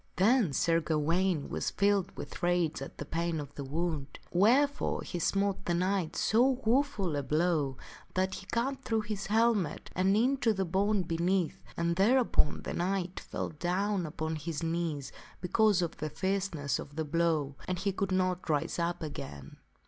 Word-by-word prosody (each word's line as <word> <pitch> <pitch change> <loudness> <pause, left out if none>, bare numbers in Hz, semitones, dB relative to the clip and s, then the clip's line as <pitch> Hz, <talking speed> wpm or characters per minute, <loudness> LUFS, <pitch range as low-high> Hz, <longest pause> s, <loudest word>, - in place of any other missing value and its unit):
Then 215 - +4
Sir 165 +4 +2
Gawaine 165 +1 +1
was - - -2
filled 200 -1 +1
with - - -7
rage 175 -4 +1
at 135 - -8
the 145 - -5
pain 165 +1 -1
of 145 -1 -7
the 140 - -6
wound, 150 0 -3
wherefore 260 - +3
he 175 - -4
smote 195 +3 0
the 175 - +1
knight 180 -2 0
so 250 +7 +3
woful 230 - +1
a 145 - 0
blow 150 -2 +1 0.4
that 190 +1 +1
he 195 - -7
cut 265 +3 -1
through 225 -2 0
his 210 -2 -4
helmet 215 -6 +1
and 190 +3 +3
into 245 -1 +2
the 190 -1 -1
bone 195 +3 +1
beneath, 175 +1 0
and 170 0 0
thereupon 230 - +3
the - - -4
knight 180 0 -1
fell - - -4
down 180 +3 -1
upon 160 0 -3
his 155 +1 -4
knees 165 -4 -2 0.3
because 200 0 +3
of 170 - -4
the 155 - -3
fierceness 185 -7 -1
of 145 - -9
the 160 0 -2
blow, 155 -3 +1
and 185 - -1
he 195 +3 0
could 195 0 -2
not 185 -1 0
rise 150 +3 0
up 170 0 -1
again. 70 - -7
175 Hz, 170 wpm, -31 LUFS, 160-200 Hz, 0.4 s, Then